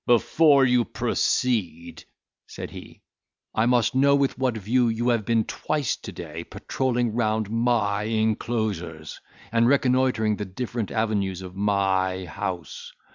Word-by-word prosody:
"Before 140 Hz, +3 st, +4 dB
you 125 Hz, -1 st, +3 dB
proceed," 85 Hz, -11 st, -1 dB, 0.4 s
said -, -, -8 dB
he, -, -, -12 dB, 0.5 s
"I 110 Hz, +2 st, +2 dB
must 120 Hz, -2 st, +2 dB
know 140 Hz, +2 st, +4 dB
with 140 Hz, -1 st, +1 dB
what 130 Hz, -3 st, -1 dB
view 120 Hz, +4 st, +1 dB
you 115 Hz, +2 st, 0 dB
have 115 Hz, -3 st, +1 dB
been 115 Hz, -1 st, +2 dB
twice 145 Hz, +2 st, -2 dB
to -, -, -9 dB
day -, -, -7 dB
patroling 125 Hz, -3 st, -2 dB
round 110 Hz, -2 st, 0 dB
my 110 Hz, -3 st, +1 dB
enclosures, 110 Hz, -7 st, -2 dB, 0.3 s
and 115 Hz, +1 st, +3 dB
reconnoitring 125 Hz, -5 st, +2 dB
the 105 Hz, -, -4 dB
different 115 Hz, +3 st, -4 dB
avenues 100 Hz, -4 st, -1 dB
of 90 Hz, 0 st, -9 dB
my 95 Hz, -2 st, 0 dB
house. 85 Hz, -1 st, -6 dB
110 Hz, 130 wpm, -24 LUFS, 100-125 Hz, 0.5 s, Before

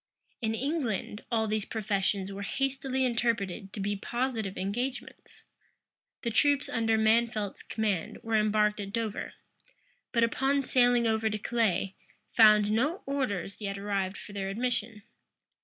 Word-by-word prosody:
In 225 Hz, -1 st, 0 dB
England, 245 Hz, -, -2 dB
all 220 Hz, -1 st, +2 dB
these 215 Hz, -1 st, 0 dB
professions 200 Hz, -2 st, -1 dB
were 195 Hz, +1 st, -6 dB
hastily 265 Hz, +3 st, -1 dB
interpreted 210 Hz, -6 st, -1 dB
to -, -, -6 dB
be 205 Hz, +1 st, -1 dB
positive 225 Hz, -2 st, -2 dB
engagements. 245 Hz, +6 st, -4 dB, 0.8 s
The 235 Hz, -, -1 dB
troops 285 Hz, +4 st, +3 dB
under 225 Hz, -2 st, +1 dB
Mansfeldt's 220 Hz, -1 st, +2 dB
command 210 Hz, -6 st, -2 dB
were 225 Hz, -, -3 dB
embarked 210 Hz, 0 st, +3 dB
at 200 Hz, -1 st, -5 dB
Dover; 225 Hz, -3 st, -3 dB, 0.8 s
but, 235 Hz, -2 st, +3 dB
upon 270 Hz, +4 st, +2 dB
sailing 245 Hz, -2 st, +4 dB
over 220 Hz, 0 st, +2 dB
to 215 Hz, -, -2 dB
Calais, 210 Hz, -3 st, 0 dB, 0.4 s
found 215 Hz, -2 st, +6 dB
no 285 Hz, -, +1 dB
orders 225 Hz, -9 st, -2 dB
yet 200 Hz, -1 st, -3 dB
arrived 195 Hz, -1 st, -2 dB
for 205 Hz, -, -10 dB
their 195 Hz, -1 st, -3 dB
admission. 225 Hz, -1 st, -2 dB
220 Hz, 135 wpm, -29 LUFS, 205-245 Hz, 0.8 s, found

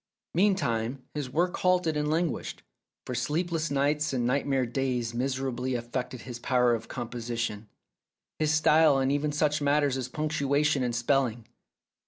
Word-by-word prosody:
Meantime 140 Hz, -, +1 dB
his 145 Hz, -4 st, -4 dB
work 175 Hz, +7 st, 0 dB
halted 180 Hz, -3 st, +2 dB
and 150 Hz, 0 st, 0 dB
languished, 165 Hz, +1 st, -2 dB, 0.4 s
for 125 Hz, -, -4 dB
sleepless 160 Hz, +6 st, -1 dB
nights 145 Hz, +1 st, +1 dB
and 125 Hz, -2 st, 0 dB
nightmare 135 Hz, 0 st, +1 dB
days 125 Hz, -1 st, -2 dB
miserably 130 Hz, 0 st, -2 dB
affected 120 Hz, +1 st, -4 dB
his 120 Hz, -2 st, -7 dB
power 125 Hz, -1 st, +2 dB
of 115 Hz, 0 st, -3 dB
composition, 115 Hz, -3 st, -4 dB, 0.7 s
his 155 Hz, -1 st, +2 dB
style 155 Hz, -2 st, +5 dB
and 135 Hz, 0 st, +1 dB
even 145 Hz, +1 st, 0 dB
such 150 Hz, 0 st, +1 dB
matters 145 Hz, -2 st, +2 dB
as 130 Hz, -2 st, -3 dB
punctuation 150 Hz, -1 st, +1 dB
and 120 Hz, -2 st, -1 dB
spelling. 120 Hz, -2 st, 0 dB
135 Hz, 140 wpm, -28 LUFS, 120-150 Hz, 0.7 s, style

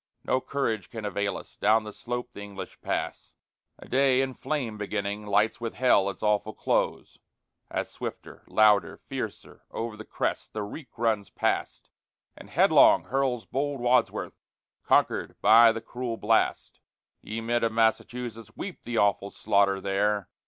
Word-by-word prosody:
No 130 Hz, -, +1 dB
courage 115 Hz, -9 st, -2 dB
can 110 Hz, -3 st, -6 dB
avail 100 Hz, 0 st, -1 dB
us, -, -, -13 dB
down 110 Hz, +1 st, +3 dB
the 105 Hz, -1 st, -8 dB
slope 120 Hz, 0 st, -5 dB
the 105 Hz, -, -9 dB
English 100 Hz, -2 st, -9 dB
pass -, -, -4 dB, 0.4 s
A -, -, -13 dB
day 135 Hz, 0 st, +3 dB
in 130 Hz, -1 st, -3 dB
flame 130 Hz, -6 st, -3 dB
beginning 105 Hz, 0 st, -3 dB
lights 105 Hz, +3 st, +2 dB
with 115 Hz, -1 st, -4 dB
hell 110 Hz, -6 st, +3 dB
its 100 Hz, -, -8 dB
awful 105 Hz, 0 st, +1 dB
close, -, -, -1 dB, 0.5 s
As -, -, -2 dB
swifter, -, -, -8 dB
louder, 105 Hz, -1 st, +4 dB
fiercer, -, -, -7 dB
o'er 115 Hz, -1 st, -4 dB
the 110 Hz, -, -9 dB
crest -, -, -3 dB
the 105 Hz, -, -3 dB
reek 125 Hz, +5 st, -9 dB
runs 110 Hz, -3 st, 0 dB
past -, -, -2 dB, 0.4 s
And -, -, -13 dB
headlong -, -, +5 dB
hurls 130 Hz, -3 st, 0 dB
bold 140 Hz, 0 st, -2 dB
Wadsworth, 125 Hz, +1 st, +1 dB, 0.4 s
conquered -, -, +1 dB
by 115 Hz, +1 st, +7 dB
the 115 Hz, 0 st, -5 dB
cruel 120 Hz, 0 st, -5 dB
blast. 110 Hz, +1 st, +1 dB, 0.4 s
Ye 110 Hz, +1 st, -5 dB
men 120 Hz, +1 st, 0 dB
of 115 Hz, -, +2 dB
Massachusetts, 115 Hz, 0 st, -1 dB
weep 185 Hz, -2 st, -6 dB
the 120 Hz, -1 st, -4 dB
awful 100 Hz, -1 st, +2 dB
slaughter 100 Hz, -1 st, +2 dB
there! 100 Hz, +1 st, 0 dB
110 Hz, 150 wpm, -27 LUFS, 105-120 Hz, 0.5 s, by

